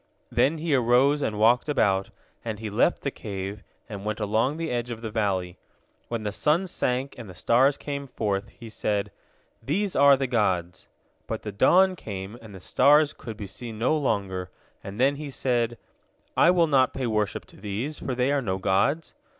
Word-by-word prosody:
Then 155 +4 +2
he 160 -1 -1
arose 130 +3 +3
and 105 -6 -1
walked 120 +6 +3
about, 100 -9 +2 0.3
and 110 -2 -4
he 110 0 -6
left 120 +11 +2
the 140 - -1
cave, 100 -2 -6 0.3
and 100 -3 -7
went 105 +1 -3
along 110 +7 0
the 165 -1 -3
edge 120 0 -2
of 115 -1 -6
the 110 - -4
valley. 95 -5 -1 0.5
When 115 -2 -3
the 105 - -2
sun 155 - +1
sank, 135 -6 -1
and 115 -5 -9
the 90 - -11
stars 130 +9 +3
came 140 -1 -5
forth, 100 -5 -2
he 115 - -12
said, 105 -2 -2 0.5
"These 195 +7 -1
are 140 0 +6
the 135 - -1
gods!" 95 -8 -1 0.4
But - - -4
the 105 - -4
dawn 185 - +4
came, 100 - -7
and 110 -3 -12
the - - -9
stars 145 - +4
could 115 -3 -9
be 105 - -6
seen 110 +3 -8
no 125 +8 +2
longer, 95 -10 -1 0.3
and 100 +3 -8
then 140 +2 +3
he 150 -1 -6
said, 120 -3 -1 0.6
"I - - +5
will 175 -2 +4
not 135 -4 +3
pay 130 - -2
worship 105 -3 -1
to - - -18
these, 110 +9 -4
for 130 - -3
they 125 +2 +1
are 145 -1 +1
no 95 -6 -2
gods." 100 - +1
120 Hz, 190 wpm, -26 LUFS, 105-140 Hz, 0.6 s, are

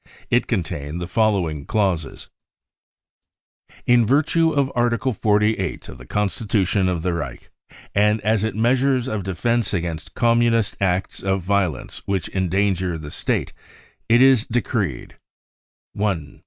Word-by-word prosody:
It 120 0 +2
contained 80 - -3
the 90 - -3
following 90 -6 0
clauses: 95 - -1 1.4
<e - - -22 0.2
In 120 -1 +5
virtue 155 - +2
of 140 -3 0
Article 120 +1 +1
48 105 -3 0
of 65 - -10
the 60 - -13
constitution 100 -2 0
of 85 -3 -2
the 90 -1 0
Reich 70 -7 -6 0.4
and 105 +2 +3
as 110 0 +1
Treasures 125 +4 +1
of 110 -6 -3
defence 115 +5 0
against 85 -3 -4
Communist 115 -2 +2
acts 95 -1 -1
of 95 -1 -1
violence 95 -7 -1
which 95 -4 -1
endanger 95 -1 0
the 75 -2 -8
State, - - -2 0.6
it 120 +2 +6
is 130 -4 +5
decreed: 110 - -2 0.4
" - - -85
1. 95 -8 -2
100 Hz, 130 wpm, -22 LUFS, 90-115 Hz, 1.4 s, it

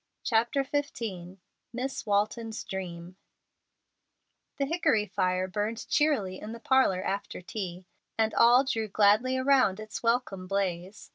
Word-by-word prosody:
CHAPTER 235 +4 +1
XV 225 - -4 0.4
MISS 255 0 -4
WALTON'S 215 +2 -1
DREAM 180 -1 -7 1.4
The 280 - 0
hickory 275 -9 +1
fire 185 -1 0
burned 210 +4 -3
cheerily 255 -12 +1
in 215 +2 -7
the 230 - -8
parlor 235 -8 +2
after 200 +1 -3
tea, 180 -1 -6 0.3
and 220 -1 +1
all 245 +3 +6
drew 225 -5 -2
gladly 215 +5 +3
around 260 -7 +3
its 215 -1 -7
welcome 230 -6 0
blaze. 190 0 -3
215 Hz, 125 wpm, -28 LUFS, 190-245 Hz, 1.4 s, all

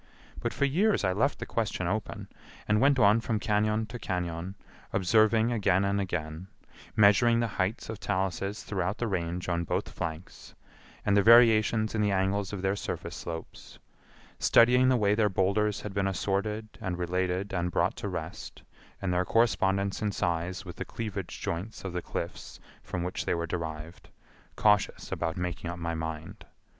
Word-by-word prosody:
But - - -2
for 140 - 0
years 195 - +2
I 95 -1 +2
left 135 +9 +1
the - - -5
question 105 -5 -2
open, 105 +4 -3 0.4
and 105 0 +3
went 140 0 +4
on 110 -1 +5
from 115 -2 -1
cañon 105 +1 +1
to 120 +1 -7
cañon, 90 -1 -3 0.4
observing 110 +4 +3
again 100 -4 +2
and 100 0 +1
again; 85 -2 -4 0.5
measuring 110 +3 +5
the 120 - +2 0.2
heights 100 +6 -2
of 110 -2 -6
taluses 100 0 -2
throughout 95 +1 -2
the 120 - -1
Range 90 -4 -2
on 85 -1 0
both - - -2
flanks, 80 +2 -7 0.5
and 100 - +3
the 100 - +6
variations 110 -1 +5
in 110 - 0
the 105 - +2
angles 95 +1 0
of 100 -2 -5
their 95 +1 +1
surface - - -5
slopes; 80 -1 -8 0.6
studying 125 +2 +5
the 130 - +4
way 105 -2 +3
their 105 -1 +2
boulders 100 +2 +1
had 105 - -6
been 100 0 0
assorted 100 +3 -1
and 95 -4 -3
related 90 +2 -1
and 90 -1 0
brought - - +1
to - - -4
rest, - - -7 0.4
and 90 -2 0
their 90 +1 +2
correspondence 100 -2 +1
in 105 -1 0
size 90 0 -2
with 90 - -9
the - - -3
cleavage 110 -4 -5
joints 90 +7 -4
of 95 -3 -5
the 90 - -2
cliffs - - -6 0.2
from 90 -2 -4
whence 90 +1 -3
they - - 0
were 85 0 -2
derived, 80 -1 -6 0.5
cautious 105 -1 +2
about 85 +1 -2
making 90 -1 -3
up 85 - -5
my 85 -1 -3
mind. 80 0 -5
100 Hz, 170 wpm, -29 LUFS, 90-110 Hz, 0.6 s, the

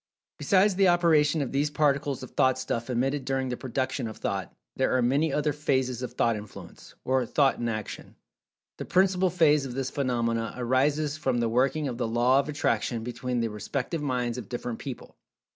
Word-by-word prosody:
Besides 200 +1 +3
the 195 +1 +3
operation 160 -4 +3
of 130 - -5
these 145 +2 +1
particles 145 -2 0
of 130 - -9
Thought 130 0 +2
stuff 125 -2 -3
emitted 135 +3 0
during 135 -1 -1
the 125 - -2
production 130 0 -3
of 110 - -8
Thought, 95 -2 -3 0.2
there 130 -1 +1
are - - +2
many 140 +6 +2
other 150 +1 0
phases 130 -4 -1
of 125 - -5
Thought 115 -1 +1
Influence, 105 -1 -11
or 130 0 +2
Thought 140 -2 +2
in 120 - -1
Action. 110 -1 -6 0.6
The - - -5
principal 185 0 +3
phase 155 -4 +3
of 125 -3 -6
this 135 -1 -2
phenomena 115 -4 -1
arises 140 +5 +1
from 130 -5 0
the 120 -1 +1
working 135 +5 +1
of 120 -2 -5
the 120 - 0
Law 120 +4 +3
of 140 - -2
Attraction 130 -5 -1
between 125 +1 -3
the 115 - -1
respective 135 - -3
minds 125 -3 -1
of 110 - -10
different 120 -1 -4
people. 135 -4 -8
130 Hz, 190 wpm, -27 LUFS, 120-150 Hz, 0.6 s, Besides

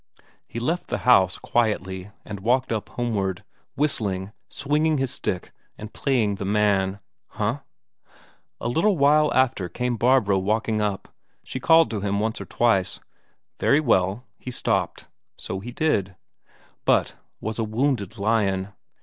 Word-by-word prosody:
He 115 - -5
left 165 +9 -1
the - - -1
house, 95 -7 +5
quietly, 95 -5 -1 0.2
and 100 -2 -6
walked 125 +5 +1
up 110 -2 -2
homeward, 100 -7 -2 0.3
whistling, 105 -10 -1 0.2
swinging 150 +2 +1
his 135 -2 -1
stick, - - -3 0.3
and 110 +1 -9
playing 120 -7 +1
the 100 - -4
man. 100 -1 +2 0.3
Huh! - - -2 1.0
A - - -3
little 170 - +2
while 150 +2 +4
after 125 -8 +1
came 125 +4 -2
Barbro 115 -5 +3
walking 110 +2 0
up; 100 -2 -2 0.4
she 130 - -5
called 165 +2 +5
to 105 -3 -2
him 100 0 0
once 110 +1 -1
or - - -6
twice. 100 -6 +1 0.6
Very 140 - +4
well; 105 -4 +1
he - - -7
stopped, 125 - -1 0.3
so 95 - -4
he 120 +5 -7
did, 100 - 0 0.7
but - - +2 0.2
was 110 +1 -4
a - - +1
wounded 110 -1 -1
lion. 100 -2 +1
110 Hz, 140 wpm, -24 LUFS, 100-130 Hz, 1.0 s, house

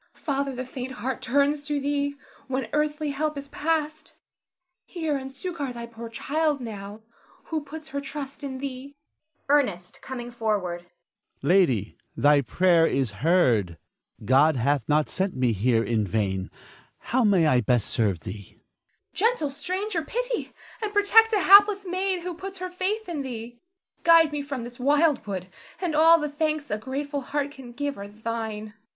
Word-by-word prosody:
Father, 275 -2 -2
the 255 +1 -4
faint 260 0 -6
heart 255 +3 -4
turns 280 +3 +2
to 295 -1 -1
thee 285 0 -1 0.3
when 265 0 -2
earthly 300 0 0
help 300 +1 -2
is 280 0 -6
past; 310 -1 -2 0.7
hear 320 -5 -3
and 265 -1 -5
succor 290 -1 -4
thy 235 -1 -6
poor 230 0 -9
child 295 +5 0
now, 210 -2 -7 0.4
who 315 -2 -3
puts 310 +2 -9
her 280 +1 -3
trust 280 0 -6
in 265 -2 -4
thee. 275 +1 -7 0.5
Ernest 250 -12 +1
[coming 245 -2 -6
forward]. 200 -7 -2 0.6
Lady, 135 - +2 0.2
thy 145 0 +5
prayer 170 +5 +3
is 130 -5 0
heard. 120 - +3 0.5
God 140 +6 +5
hath 140 +4 0
not 150 0 +3
sent 190 0 -2
me 125 -3 +2
here 115 +3 +2
in 110 -4 0
vain. 95 -2 -1 0.5
How 255 +2 0
may 195 -6 +4
I 130 -5 +4
best 120 0 +1
serve 100 -8 0
thee? 100 +3 -8
Zara. - - -31 0.8
Gentle 305 -12 -3
stranger, 365 +5 -2
pity - - -3 0.3
and 430 -2 -2
protect 425 +2 +5
a 420 -3 +2
hapless 400 +1 +7
maid 370 0 -1
who 360 0 -4
puts 385 +3 -8
her 365 0 -5
faith 390 +4 -2
in 330 -5 -3
thee. 240 -2 -7 0.4
Guide 330 -2 +6
me 295 -1 -2
from 280 -4 -5
this 240 +1 -9
wild 290 0 +2
wood, 185 -2 -4 0.3
and 345 -4 -1
all 325 +2 +7
the 300 - -1
thanks 305 0 -2
a 210 - -1
grateful 280 +4 -4
heart 285 +2 -2
can 265 -4 -11
give 285 0 -4
are 200 - -6
thine. 220 0 -4
Ernest. 215 - -22
270 Hz, 165 wpm, -26 LUFS, 195-305 Hz, 0.8 s, hapless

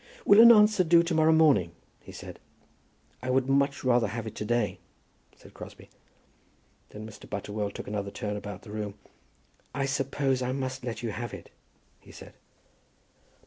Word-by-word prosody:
"Will 205 +2 +7
an 235 +1 +10
answer 210 -3 +5
do 170 0 +5
to 170 0 -2
morrow 160 0 +4
morning?" 145 - +3 0.3
he - - -13
said. - - -10 0.8
"I 130 - -5
would 130 0 +1
much 140 +1 +1
rather 120 -3 +2
have 115 +2 -5
it 110 - -7
to 105 - -4
day," 105 -5 -1 0.6
said - - -18
Crosbie. - - -12 1.0
Then 105 +1 -9
Mr. 110 - -13
Butterwell 105 +1 -4
took - - -8
another 100 -1 -3
turn 105 +1 -5
about 105 -1 -8
the 105 - -11
room. 105 -2 -5 0.8
"I 140 - -1
suppose 135 -1 -1
I 125 0 -2
must 130 -1 -4
let 120 -1 -5
you 115 - -2
have 120 +3 -6
it," - - -13 0.5
he - - -17
said. - - -13
125 Hz, 170 wpm, -27 LUFS, 105-140 Hz, 1.0 s, an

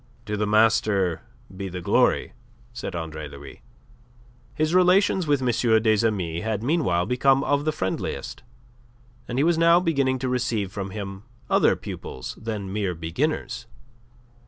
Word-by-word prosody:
"To 105 - -3
the 105 0 -1
master 105 -4 +2 0.3
be 95 0 -5
the 90 0 -5
glory," 85 - +2 0.4
said - - -5
Andre 80 -2 -5
Louis. 70 0 -12 0.9
His 155 +2 0
relations 185 0 +4
with 145 -3 +2
M. 115 -2 +3
des 110 0 +3
Amis 85 -6 -2
had 110 -1 -2
meanwhile 120 - +1
become 135 +2 +3
of 145 0 +1
the 155 - +2
friendliest, 95 -12 -4 0.9
and 120 - -4
he 140 - +3
was 165 0 +2
now 170 +1 +6
beginning 140 -7 +1
to 130 +1 -3
receive 120 -6 -1
from 100 -1 -5
him 95 0 -7 0.3
other - - +4
pupils 65 - -7
than 105 -4 -4
mere 100 -4 -1
beginners. 120 - -2
110 Hz, 145 wpm, -24 LUFS, 95-140 Hz, 0.9 s, now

